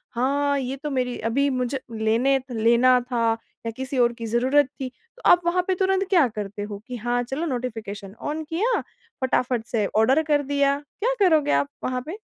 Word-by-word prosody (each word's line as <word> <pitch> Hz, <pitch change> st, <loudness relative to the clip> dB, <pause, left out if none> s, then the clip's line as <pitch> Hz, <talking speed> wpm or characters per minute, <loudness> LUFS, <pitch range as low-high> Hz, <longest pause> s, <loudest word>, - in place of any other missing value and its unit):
हाँ, 280 Hz, +3 st, +1 dB
ये 260 Hz, 0 st, -3 dB
तो 300 Hz, -, -2 dB
मेरी 250 Hz, -2 st, -1 dB
अभी 280 Hz, +4 st, +2 dB
मुझे 255 Hz, 0 st, -1 dB, 0.2 s
लेने 240 Hz, +5 st, +3 dB
लेना 235 Hz, +2 st, +4 dB
था 230 Hz, -2 st, 0 dB, 0.3 s
या 230 Hz, -, -2 dB
किसी 265 Hz, +1 st, -4 dB
और 240 Hz, -1 st, +4 dB
की 230 Hz, -1 st, -7 dB
ज़रूरत 260 Hz, +6 st, +3 dB, 0.2 s
थी, 260 Hz, -, -2 dB
तो 465 Hz, -, -24 dB
आप 355 Hz, -, +6 dB
वहाँ 360 Hz, +1 st, +2 dB
पे 375 Hz, -, +2 dB
तुरंत 385 Hz, +1 st, +1 dB
क्या 340 Hz, -8 st, +5 dB
करते 210 Hz, -2 st, -6 dB
हो, 205 Hz, 0 st, -6 dB
कि 250 Hz, -, -5 dB
हाँ, 240 Hz, +2 st, 0 dB
चलो 270 Hz, +7 st, -3 dB
नोटिफिकेशन 225 Hz, -, -5 dB
ऑन 305 Hz, +2 st, -3 dB
किया, 430 Hz, +9 st, +1 dB, 0.4 s
फटाफट 250 Hz, -2 st, 0 dB
से 220 Hz, -4 st, 0 dB
ऑर्डर 250 Hz, +8 st, +4 dB
कर 295 Hz, -2 st, +2 dB
दिया, 280 Hz, 0 st, +1 dB, 0.2 s
क्या 485 Hz, +4 st, +1 dB
करोगे 310 Hz, -5 st, +3 dB
आप, -, -, +2 dB, 0.2 s
वहाँ 255 Hz, 0 st, -1 dB
पे? 335 Hz, +6 st, -6 dB
260 Hz, 190 wpm, -24 LUFS, 235-290 Hz, 0.4 s, आप